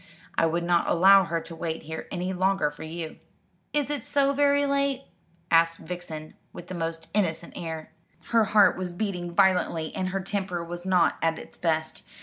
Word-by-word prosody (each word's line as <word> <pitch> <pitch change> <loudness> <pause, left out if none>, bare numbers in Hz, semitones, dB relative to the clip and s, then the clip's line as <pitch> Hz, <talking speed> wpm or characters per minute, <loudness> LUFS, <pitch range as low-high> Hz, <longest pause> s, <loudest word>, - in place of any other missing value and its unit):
I 165 - +3
would 170 +1 -1
not 170 0 +2
allow 195 +2 +6
her 170 0 -1
to 165 +1 -9
wait 165 0 -4
here 160 +1 -6
any 185 0 -2
longer 190 -3 +1
for 150 - -14
you." 160 0 -6 0.5
"Is 295 -1 0
it 285 -6 -2
so 280 -1 +2
very 285 0 +3
late?" 280 -1 0 0.5
asked 165 0 +4
Vixen, 165 -4 -7 0.2
with 175 - -10
the - - -5
most 165 -1 -4
innocent 170 -5 -1
air. 160 -2 -6 0.4
Her 230 -2 +4
heart 205 -2 +5
was 180 -2 -4
beating 175 -3 -3
violently, 180 -4 +2
and 185 0 -2
her 195 +1 -2
temper 190 -3 -3
was 175 +2 -7
not 180 -2 +3
at 165 0 +1
its - - -11
best. 160 -2 -1
175 Hz, 180 wpm, -26 LUFS, 165-195 Hz, 0.5 s, allow